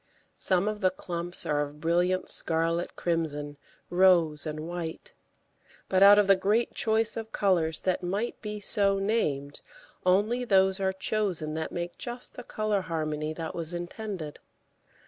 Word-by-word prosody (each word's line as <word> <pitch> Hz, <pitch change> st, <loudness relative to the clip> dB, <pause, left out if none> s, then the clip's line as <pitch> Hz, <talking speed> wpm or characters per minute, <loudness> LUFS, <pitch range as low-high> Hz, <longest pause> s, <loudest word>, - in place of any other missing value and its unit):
Some 185 Hz, +1 st, +1 dB
of 215 Hz, 0 st, -3 dB
the 185 Hz, -, +4 dB
clumps 175 Hz, 0 st, 0 dB
are 150 Hz, -1 st, +1 dB
of 145 Hz, 0 st, -5 dB
brilliant 175 Hz, +3 st, +1 dB
scarlet 165 Hz, +1 st, -1 dB
crimson, 150 Hz, -4 st, -2 dB, 0.3 s
rose 175 Hz, -4 st, +4 dB
and 155 Hz, 0 st, -4 dB
white, 170 Hz, -, -6 dB, 0.8 s
but 190 Hz, 0 st, +2 dB
out 200 Hz, +1 st, +9 dB
of 210 Hz, -, +5 dB
the 195 Hz, 0 st, +6 dB
great 210 Hz, +5 st, +1 dB
choice 220 Hz, 0 st, +1 dB
of 225 Hz, -1 st, -6 dB
colours 170 Hz, -5 st, +1 dB
that 185 Hz, 0 st, 0 dB
might 200 Hz, +6 st, -3 dB
be 210 Hz, -1 st, -5 dB
so 200 Hz, -1 st, +2 dB
named 150 Hz, -9 st, -1 dB, 0.4 s
only 205 Hz, +7 st, +2 dB
those 190 Hz, -3 st, +3 dB
are 190 Hz, -1 st, +1 dB
chosen 190 Hz, -5 st, -2 dB
that 160 Hz, 0 st, -3 dB
make 175 Hz, 0 st, -5 dB
just 245 Hz, 0 st, -6 dB
the -, -, -9 dB
colour 215 Hz, -2 st, -1 dB
harmony 155 Hz, -3 st, -3 dB
that 160 Hz, 0 st, -5 dB
was 170 Hz, 0 st, 0 dB
intended. 175 Hz, -3 st, -6 dB
180 Hz, 150 wpm, -28 LUFS, 160-205 Hz, 0.8 s, out